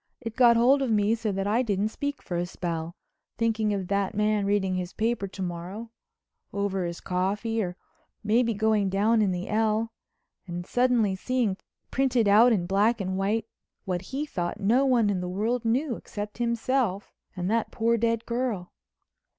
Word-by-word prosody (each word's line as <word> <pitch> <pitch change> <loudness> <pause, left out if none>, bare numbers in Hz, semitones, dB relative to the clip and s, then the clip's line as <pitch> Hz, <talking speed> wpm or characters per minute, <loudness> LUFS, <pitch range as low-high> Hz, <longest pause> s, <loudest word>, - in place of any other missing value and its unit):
It 230 -3 -6
got 240 -2 +6
hold 260 +4 +5
of 265 - 0
me 210 0 +3
so 225 -2 -1
that 195 0 -2
I 215 +4 +2
didn't 210 -3 0
speak 285 +5 -4
for 180 - -4
a 175 +1 -1
spell, 170 -2 -4 0.4
thinking 225 -2 +1
of 195 -3 -2
that 200 0 0
man 210 -1 +1
reading 200 -2 +1
his 180 -1 -3
paper 225 -2 -1
to 190 0 -9
morrow—over 200 - -6
his 170 0 -5
coffee 200 +5 -1
or 180 -2 -4 0.5
maybe 230 +2 +2
going 215 -1 +2
down 215 +4 +3
in 200 -3 +2
the 180 +1 -3
L—and 215 -5 -3
suddenly 245 -4 +2
seeing 235 -1 0 0.4
printed 255 -4 +2
out 220 +5 +6
in 190 -6 +1
black 205 +6 +2
and 190 -1 -2
white 205 +3 0 0.4
what 180 -3 -2
he 270 +10 -4
thought 175 -8 -3
no 240 +7 +3
one 235 -5 +3
in 185 -2 -1
the 180 - -4
world 220 +6 -1
knew 245 +3 +1
except 210 +2 -7
himself 235 -3 0 0.2
and 180 -1 -3
that 230 0 +1
poor 230 +1 +1
dead 230 0 0
girl. 235 -7 -2
215 Hz, 170 wpm, -27 LUFS, 190-235 Hz, 0.5 s, got